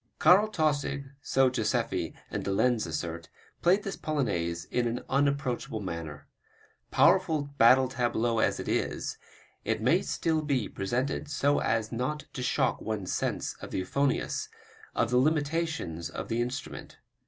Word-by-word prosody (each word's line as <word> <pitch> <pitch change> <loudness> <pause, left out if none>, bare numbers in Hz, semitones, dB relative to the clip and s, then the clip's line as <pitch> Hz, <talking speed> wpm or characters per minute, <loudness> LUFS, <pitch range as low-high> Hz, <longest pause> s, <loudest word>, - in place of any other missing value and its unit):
Karl 200 +4 +6
Tausig, 145 -6 -1
so 135 -1 +3
Joseffy 110 -4 -1 0.2
and - - -3
de 100 - -2
Lenz 120 +2 +2
assert, 80 +1 -4 0.3
played 190 +4 +4
this 195 - -4
Polonaise 85 - -1
in 120 -1 +1
an 120 +2 -2
unapproachable 140 -5 0
manner. 85 -6 -6 0.6
Powerful 165 -6 +4 0.2
battle 130 +3 +7
tableau 120 -2 0
as - - +1
it - - -5
is, - - -2 0.4
it - - 0
may - - +3
still 160 -1 0
be 140 -7 0
presented 125 +9 -2
so 145 0 +2
as 110 -1 0
not 130 +5 -2
to 130 - -5
shock 125 - +1
one's 105 -4 -3
sense - - -2
of - - -7
the - - -3
euphonious, 135 +9 0 0.5
of 115 - +1
the 125 - +4
limitations 150 - 0
of - - -6
the 115 +1 0
instrument. 125 +2 -5
125 Hz, 145 wpm, -29 LUFS, 110-145 Hz, 0.6 s, battle